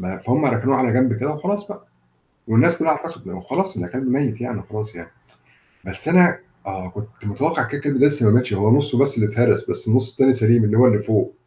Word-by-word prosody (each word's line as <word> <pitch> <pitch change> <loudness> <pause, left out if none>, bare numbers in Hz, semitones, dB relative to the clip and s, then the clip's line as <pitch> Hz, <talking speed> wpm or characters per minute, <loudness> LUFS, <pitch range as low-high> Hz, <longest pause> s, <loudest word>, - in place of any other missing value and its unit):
ما 95 +1 -6
فهم 130 +6 0
ركنوه 130 +1 +1
على 125 -3 +1
جنب 125 0 +2
كده 140 +5 -3
وخلاص 200 +7 -4
بقى 205 - -11 0.6
والناس 120 +9 +3
كلها 165 -1 0
اعتقدت 165 +2 -7
خلاص 190 0 -3
إن - - -4
كلب 130 +1 -5
ميّت 125 -3 -1
يعني 120 -3 -4
وخلاص 105 -2 -8
يعني. 85 -1 -12 0.8
بس 95 +8 -9
أنا 175 +1 +4 0.3
آه 95 -2 -7
كنت 105 +3 -9 0.2
متوقع 135 +10 -1
كده، 145 0 -5
كده 145 -1 -2
إنه 140 +3 +5
لسه 145 -5 0
ما 105 - +5
ماتش، 125 -2 +2
هو 105 +6 +3
نُصّه 145 -3 -1
بس 140 +1 +2
اللي 105 -1 0
اتهرس، 120 +2 +1
بس - - -5
النُص 125 +3 +1
التاني 135 0 +3
سليم 115 -2 +3
اللي 105 +1 +1
هو 125 - +7
اللي 105 -4 +3
فوق. 105 -1 0
125 Hz, 220 wpm, -20 LUFS, 110-145 Hz, 0.8 s, هو